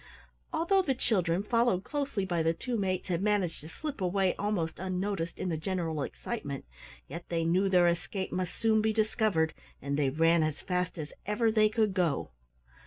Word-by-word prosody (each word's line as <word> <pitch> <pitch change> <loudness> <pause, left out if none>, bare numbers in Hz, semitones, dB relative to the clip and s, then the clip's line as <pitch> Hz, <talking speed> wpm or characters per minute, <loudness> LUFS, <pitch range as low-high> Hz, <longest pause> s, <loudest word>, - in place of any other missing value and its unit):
Although 340 +4 +3
the 275 -8 0
children, 185 -7 +1
followed 230 -4 +2
closely 280 -9 -2
by 175 -3 0
the 165 +1 +2
two 245 +8 -3
mates, 185 -3 -1
had 175 -1 0
managed 200 -6 +1
to 155 - -10
slip 290 - -6
away 185 +1 +2
almost 195 -6 -2
unnoticed 185 -2 -2
in 185 - -2
the 160 - -1
general 165 -2 -2
excitement, 140 - -4 0.4
yet 170 - -8
they 165 -1 0
knew 185 +4 +3
their 180 -2 +5
escape 185 +3 -1
must 180 -1 -2
soon 220 -1 +3
be 220 0 +1
discovered 215 -7 +1 0.3
and 140 +1 -2
they 140 -2 +3
ran 165 +4 +4
as 155 -1 -1
fast 180 0 -2
as 150 -2 -6
ever 220 +2 +2
they 215 -1 +4
could 215 -2 +1
go. 175 -6 0
185 Hz, 180 wpm, -30 LUFS, 165-215 Hz, 0.4 s, their